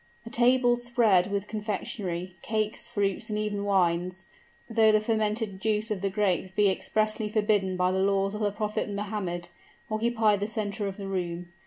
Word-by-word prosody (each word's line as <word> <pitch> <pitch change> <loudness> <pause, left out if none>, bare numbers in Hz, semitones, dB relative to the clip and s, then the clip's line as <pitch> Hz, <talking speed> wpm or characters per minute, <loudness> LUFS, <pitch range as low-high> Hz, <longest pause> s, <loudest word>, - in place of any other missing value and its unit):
A 230 - -8
table 245 0 +4
spread 225 -6 +2
with 200 0 -2
confectionery, 195 -4 -4
cakes, 215 0 -2
fruits, 205 0 -1
and 210 - -1
even 210 -1 -2
wines 185 -1 +1 0.4
though 225 -1 +4
the 215 - +4
fermented 215 -2 -1
juice 215 +1 0
of 200 -3 -2
the 195 - 0
grape 190 -2 0
be 205 -2 +4
expressly 215 +2 0
forbidden 205 -3 +1
by 180 0 +2
the 190 - 0
laws 195 0 +2
of 210 - -4
the 205 - +2
Prophet 210 0 -2
Mohammed 200 -4 -3 0.4
occupied 220 -2 +2
the 205 - -1
center 205 -2 -3
of 195 - -5
the 200 -1 -6
room. 175 -2 -3
205 Hz, 170 wpm, -28 LUFS, 190-215 Hz, 0.4 s, table